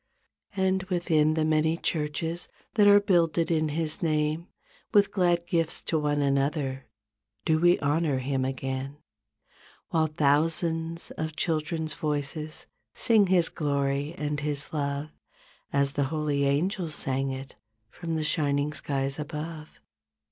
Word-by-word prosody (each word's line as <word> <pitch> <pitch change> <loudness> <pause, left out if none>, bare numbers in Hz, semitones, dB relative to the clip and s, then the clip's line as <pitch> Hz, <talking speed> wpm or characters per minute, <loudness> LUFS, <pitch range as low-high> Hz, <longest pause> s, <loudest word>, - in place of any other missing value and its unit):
44 190 -1 +2
And 190 0 +1
within 160 -4 +2
the 160 -1 +1
many 155 +1 +2
churches 160 +2 -2 0.3
That 210 -2 +5
are 205 0 +8
builded 170 -4 +2
in 155 -1 +1
His 155 +1 -1
name, 155 +1 0 0.5
With 205 -1 +5
glad 175 -3 +2
gifts 165 -2 -1
to 160 - 0
one 145 -1 +1
another 140 -1 0 0.6
Do 160 -1 +3
we 175 +1 +5
honor 145 0 +1
Him 130 0 -1
again 135 +1 -3 0.9
While 160 -1 +2
thousands 160 +3 0
of 160 -1 -3
children's 160 -1 -1
voices 150 +1 -3 0.3
Sing 220 -4 +4
His 180 -2 +4
glory 140 +1 -1
and 150 -2 -2
His 145 0 -2
love 145 0 -2 0.6
As 140 0 +2
the 140 0 0
holy 145 -1 0
angels 160 +3 0
sang 135 +1 -1
it 135 0 -6 0.4
From 165 -2 -4
the 155 - -1
shining 145 -1 +2
skies 135 -1 -2
above. 155 +1 -6
155 Hz, 135 wpm, -27 LUFS, 140-165 Hz, 0.9 s, are